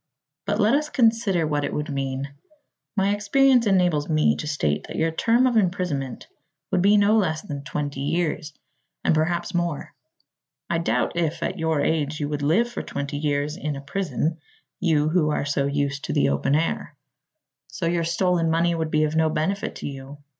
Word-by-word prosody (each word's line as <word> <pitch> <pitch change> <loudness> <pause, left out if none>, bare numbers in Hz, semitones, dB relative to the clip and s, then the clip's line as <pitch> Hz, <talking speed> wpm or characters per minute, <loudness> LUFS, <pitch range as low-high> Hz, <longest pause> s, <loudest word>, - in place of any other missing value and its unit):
But 210 - 0
let 215 +2 +4
us 300 +2 +1
consider 225 - +2
what 145 -1 -1
it - - -2
would 150 +1 -3
mean. 135 0 -3 0.6
My 195 +1 +3
experience 245 +4 +3
enables 180 -6 +2
me 155 -1 +3
to 150 - -5
state 75 - -1
that - - -7
your 165 0 +1
term 230 +9 +3
of 245 -3 +2
imprisonment 175 - -1 0.5
would 180 - +2
be 205 +3 +5
no 205 +1 +4
less 160 -7 0
than 140 -1 -6
twenty 145 -1 -4
years, 155 +1 -1 0.5
and - - +3
perhaps 170 +2 0
more. 175 -4 -2 0.8
I 170 - +1
doubt 165 - 0
if, 170 -2 -1
at 185 - -3
your 160 -2 +1
age, 155 -1 0
you 145 - -1
would 145 -1 -3
live 165 +12 +3
for 240 - -5
twenty 140 0 -4
years 145 0 -1
in 150 -2 -3
a 140 - -6
prison 160 +1 -2 0.4
you 155 -4 +2
who 160 -2 +2
are 150 - -1
so 140 -1 0
used 140 0 -1
to - - -3
the 70 - +3
open 70 - +1
air. 165 +2 -1 0.7
So 175 - -5
your 170 0 +1
stolen 170 0 +1
money 170 +1 +2
would 160 -1 -2
be 155 0 +2
of 155 +1 -1
no 160 0 +3
benefit 160 +6 -2
to - - -5
you. 135 0 -8
160 Hz, 190 wpm, -24 LUFS, 145-180 Hz, 0.8 s, be